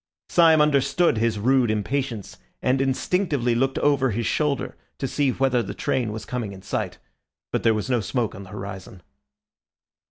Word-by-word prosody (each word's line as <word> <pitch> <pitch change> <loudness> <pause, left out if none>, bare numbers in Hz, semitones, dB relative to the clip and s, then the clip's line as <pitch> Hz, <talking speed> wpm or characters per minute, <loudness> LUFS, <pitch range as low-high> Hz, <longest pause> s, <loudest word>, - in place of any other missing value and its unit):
Syme 160 -3 +5
understood 150 -1 +3
his 115 -1 +1
rude 125 +2 +3
impatience 115 +1 -2 0.2
and 130 +1 +1
instinctively 135 -1 0
looked 130 +3 0
over 140 -3 +2
his 115 +1 -2
shoulder 150 -3 -1 0.2
to 135 - -2
see 140 +1 +1
whether 130 -2 +1
the 100 - -6
train 125 -5 -1
was 110 0 -6
coming 120 -5 -4
in 95 -1 -12
sight. - - -3 0.5
But - - 0
there 115 -1 +3
was 105 - -2
no 125 -2 +2
smoke 120 0 -1
on 95 - -9
the 95 - -11
horizon. 95 -3 -8
125 Hz, 165 wpm, -24 LUFS, 110-135 Hz, 0.5 s, Syme